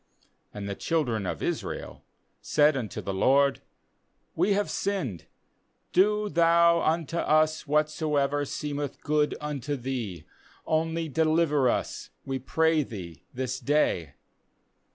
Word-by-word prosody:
7 105 Hz, -, -6 dB
15And -, -, -4 dB
the 100 Hz, -, -2 dB
children 120 Hz, -, -1 dB
of -, -, -4 dB
Israel -, -, -4 dB, 0.4 s
said 150 Hz, 0 st, +3 dB
unto 120 Hz, -6 st, -4 dB
the 95 Hz, -, -4 dB
LORD: 135 Hz, +8 st, +3 dB, 0.7 s
'We 185 Hz, +5 st, +2 dB
have 205 Hz, +1 st, 0 dB
sinned; 170 Hz, -, -2 dB, 0.7 s
do 210 Hz, +3 st, +3 dB
Thou 170 Hz, -1 st, +4 dB
unto 165 Hz, 0 st, 0 dB
us 155 Hz, -1 st, +2 dB
whatsoever 150 Hz, -1 st, +1 dB
seemeth 145 Hz, 0 st, -4 dB
good 150 Hz, -1 st, +1 dB
unto 145 Hz, -1 st, -3 dB
Thee; 120 Hz, -, -4 dB, 0.4 s
only 160 Hz, +1 st, 0 dB
deliver 155 Hz, -2 st, +2 dB
us, -, -, -2 dB, 0.2 s
we 135 Hz, 0 st, -2 dB
pray 160 Hz, +4 st, +2 dB
Thee, 90 Hz, -, -8 dB
this 130 Hz, 0 st, -3 dB
day.' 90 Hz, -, +1 dB
150 Hz, 120 wpm, -27 LUFS, 130-160 Hz, 0.7 s, Thou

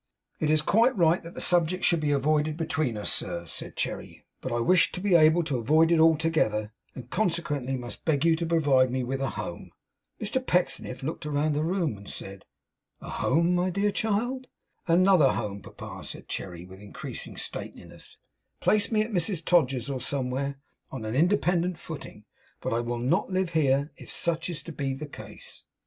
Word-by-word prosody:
'It's 155 Hz, 0 st, +2 dB
quite 230 Hz, +7 st, +3 dB
right 170 Hz, 0 st, +4 dB
that 170 Hz, +1 st, -11 dB
the -, -, -5 dB
subject 175 Hz, +1 st, +2 dB
should 170 Hz, -, +3 dB
be 150 Hz, -1 st, 0 dB
avoided 150 Hz, +2 st, +1 dB
between 155 Hz, -8 st, -1 dB
us, 105 Hz, -, 0 dB
sir,' 85 Hz, 0 st, -3 dB
said -, -, -6 dB
Cherry. -, -, -4 dB, 0.2 s
'But 130 Hz, -, -4 dB
I 120 Hz, -, 0 dB
wish 175 Hz, +7 st, +4 dB
to -, -, -4 dB
be 195 Hz, 0 st, +1 dB
able 165 Hz, +1 st, +6 dB
to 145 Hz, -5 st, -1 dB
avoid 155 Hz, +7 st, +4 dB
it 170 Hz, -, +4 dB
altogether, 155 Hz, -10 st, +2 dB, 0.2 s
and 125 Hz, -1 st, -10 dB
consequently 155 Hz, -, -1 dB
must 120 Hz, -1 st, -8 dB
beg 155 Hz, -1 st, +1 dB
you 165 Hz, -1 st, +5 dB
to 170 Hz, 0 st, -2 dB
provide 145 Hz, -6 st, +3 dB
me 130 Hz, +1 st, -1 dB
with 135 Hz, +2 st, -3 dB
a 135 Hz, -, 0 dB
home.' -, -, -6 dB, 0.5 s
Mr 260 Hz, -1 st, -1 dB
Pecksniff 175 Hz, -, 0 dB
looked 155 Hz, +1 st, -4 dB
about 150 Hz, +1 st, +1 dB
the 150 Hz, +1 st, 0 dB
room, 165 Hz, -, 0 dB
and 100 Hz, 0 st, -11 dB
said, 95 Hz, 0 st, -8 dB, 0.5 s
'A -, -, -9 dB
home, 170 Hz, +6 st, +3 dB
my 180 Hz, +1 st, +2 dB
child!' 220 Hz, +6 st, 0 dB, 0.4 s
'Another 175 Hz, -3 st, +5 dB
home, 100 Hz, -1 st, -4 dB
papa,' -, -, -9 dB
said -, -, -7 dB
Cherry, 90 Hz, -2 st, -5 dB
with 95 Hz, +1 st, -13 dB
increasing 105 Hz, -, -7 dB
stateliness -, -, -7 dB, 0.4 s
'Place 210 Hz, +1 st, +2 dB
me 215 Hz, -1 st, +3 dB
at 220 Hz, -, -7 dB
Mrs 175 Hz, -2 st, 0 dB
Todgers's 135 Hz, -8 st, +2 dB
or 135 Hz, -2 st, -3 dB
somewhere, 140 Hz, +1 st, -2 dB, 0.3 s
on 130 Hz, -5 st, -6 dB
an 110 Hz, -, -3 dB
independent 175 Hz, +2 st, +2 dB
footing; 145 Hz, -10 st, -9 dB, 0.3 s
but -, -, -2 dB
I 115 Hz, -, +1 dB
will 120 Hz, 0 st, -2 dB
not 125 Hz, +8 st, +1 dB
live 185 Hz, -2 st, 0 dB
here, 140 Hz, -2 st, +2 dB
if -, -, -11 dB
such 170 Hz, 0 st, -1 dB
is 170 Hz, -4 st, -4 dB
to 170 Hz, -, -7 dB
be 140 Hz, -3 st, -2 dB
the 150 Hz, +3 st, -6 dB
case. 145 Hz, -, -10 dB
155 Hz, 185 wpm, -27 LUFS, 130-175 Hz, 0.5 s, able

